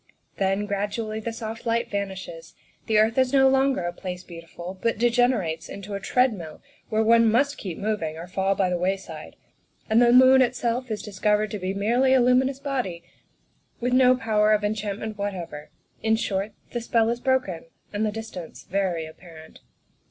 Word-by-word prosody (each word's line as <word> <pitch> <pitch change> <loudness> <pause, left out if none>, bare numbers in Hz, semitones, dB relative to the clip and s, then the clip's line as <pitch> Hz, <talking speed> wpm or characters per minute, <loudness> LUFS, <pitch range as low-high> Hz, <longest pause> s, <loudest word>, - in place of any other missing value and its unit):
Then, 195 +1 0
gradually, 210 +2 -3
the 230 +1 -4
soft 225 0 -6
light 235 0 -1
vanishes; 190 -5 -5 0.3
the 220 - +2
earth 220 +3 +3
is 260 -1 +3
no 270 -1 +5
longer 265 -6 +2
a 175 0 -3
Place 180 0 -6
Beautiful, 170 +2 -9
but 230 -1 0
degenerates 230 -9 +1
into 200 +1 -8
a 200 - -2
treadmill 200 -9 0 0.3
where 220 0 +2
one 230 0 +5
must 280 +5 +1
keep 180 -5 -5
moving 200 -7 -2
or 165 - -7
fall 190 +2 0
by 185 -1 +1
the 175 - 0
wayside; 190 +2 -4 0.5
and 220 +2 +4
the 240 -1 +5
moon 260 +1 +7
itself 245 0 0
is 215 -1 -3
discovered 210 0 0
to 210 - -4
be 185 +1 -3
merely 240 +6 +2
a - - +5
luminous 255 +2 +3
body, 250 -12 -3 0.8
with 245 +1 -1
no 255 0 +6
power 215 -4 +2
of 210 0 +1
enchantment 210 0 -3
what 200 -1 -2
ever; 160 -4 -8 0.3
in 220 0 +2
short, 205 -2 -2 0.2
the 240 - -3
spell 230 -1 +2
is 235 +1 -1
broken 255 -11 0 0.3
and 205 +1 -1
the 215 - +1
distance 215 -6 -8
very 180 -4 -1
apparent. 160 0 -13
215 Hz, 175 wpm, -25 LUFS, 190-240 Hz, 0.8 s, moon